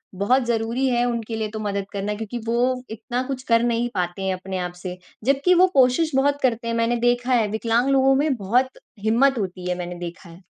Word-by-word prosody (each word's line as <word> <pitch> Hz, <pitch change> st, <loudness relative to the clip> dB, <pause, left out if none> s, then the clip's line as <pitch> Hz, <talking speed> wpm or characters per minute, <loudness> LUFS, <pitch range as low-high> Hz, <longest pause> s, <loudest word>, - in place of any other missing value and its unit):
बहुत 245 Hz, +8 st, +2 dB
ज़रूरी 235 Hz, +3 st, 0 dB
है 240 Hz, -1 st, +2 dB
उनके 235 Hz, -2 st, -3 dB
लिए 220 Hz, -1 st, -2 dB
तो 220 Hz, -, -5 dB
मदद 200 Hz, -2 st, -2 dB
करना 200 Hz, +1 st, -2 dB
क्योंकि 220 Hz, +2 st, -5 dB
वो 250 Hz, +2 st, +1 dB
इतना 240 Hz, +3 st, -3 dB
कुछ 265 Hz, -2 st, -4 dB
कर 230 Hz, -2 st, +3 dB
नहीं 240 Hz, 0 st, 0 dB
पाते 175 Hz, +1 st, -2 dB
हैं 190 Hz, 0 st, 0 dB
अपने 185 Hz, +1 st, -5 dB
आप 180 Hz, -1 st, -3 dB
से। 180 Hz, -1 st, -5 dB, 0.3 s
जबकि 275 Hz, +7 st, +3 dB
वो -, -, +7 dB
कोशिश 265 Hz, +4 st, +3 dB
बहुत 285 Hz, +1 st, +2 dB
करते 235 Hz, -3 st, 0 dB
हैं 230 Hz, -, -1 dB
मैंने 230 Hz, +1 st, +1 dB
देखा 245 Hz, +1 st, +1 dB
है 230 Hz, -3 st, +3 dB
विकलांग 230 Hz, +4 st, +1 dB
लोगों 270 Hz, 0 st, +4 dB
में 285 Hz, 0 st, +1 dB
बहुत 245 Hz, +5 st, 0 dB, 0.2 s
हिम्मत 250 Hz, +5 st, +3 dB
होती 185 Hz, -3 st, -4 dB
है 180 Hz, -, -1 dB
मैंने 180 Hz, 0 st, -5 dB
देखा 175 Hz, 0 st, -8 dB
है। 170 Hz, +3 st, -15 dB
230 Hz, 215 wpm, -23 LUFS, 200-255 Hz, 0.3 s, वो